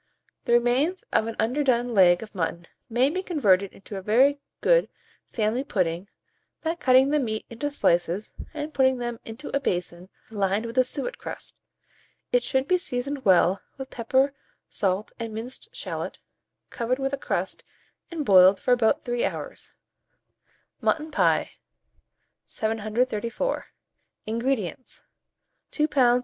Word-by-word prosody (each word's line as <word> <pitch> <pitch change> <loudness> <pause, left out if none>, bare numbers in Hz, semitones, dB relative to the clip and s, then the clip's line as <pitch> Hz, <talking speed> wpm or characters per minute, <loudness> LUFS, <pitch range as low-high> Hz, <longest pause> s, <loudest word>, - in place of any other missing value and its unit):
The 235 - +2
remains 250 +10 +2
of 220 - +3
an 230 - -4
underdone 245 -1 +1
leg 180 -2 +5
of 215 - -12
mutton 170 -2 -3 0.2
may 250 +4 +3
be 370 +3 -2
converted 200 - +2
into 200 +1 -9
a - - -5
very 260 +8 +4 0.2
good - - +4 0.4
family 225 +3 0
pudding, 180 -6 -1 0.6
by 325 0 0
cutting 265 -4 +4
the 300 - +3
meat 220 -5 -2
into 260 +6 -3
slices, 175 - 0 0.2
and 305 0 -5
putting 260 -1 +3
them 240 -1 -4
into 230 +7 -6
a - - +3
basin 180 -6 -3 0.2
lined 200 +1 0
with 230 +3 -1
a - - +7
suet 280 - -4
crust. - - -7 0.8
It - - +4
should 265 - 0
be 365 0 +3
seasoned 270 -2 -3
well 190 0 +4 0.2
with 265 -1 -7
pepper, 265 +4 +1 0.3
salt, 195 +1 -1
and 225 -2 -5
minced 240 +4 -7
shalot, - - -5 0.5
covered 240 +2 -1
with 270 0 -2
a - - +3
crust, - - -3 0.5
and 320 -4 -4
boiled 190 -1 +7
for 250 - 0
about 235 -3 +2
3 240 -1 -1
hours. - - -5 1.1
MUTTON 310 0 0
PIE. - - +2 0.9
734. 225 - -1 0.6
INGREDIENTS. 235 0 -2 0.6
2 300 0 +1
lbs. 250 -4 +4
240 Hz, 140 wpm, -26 LUFS, 210-275 Hz, 1.1 s, a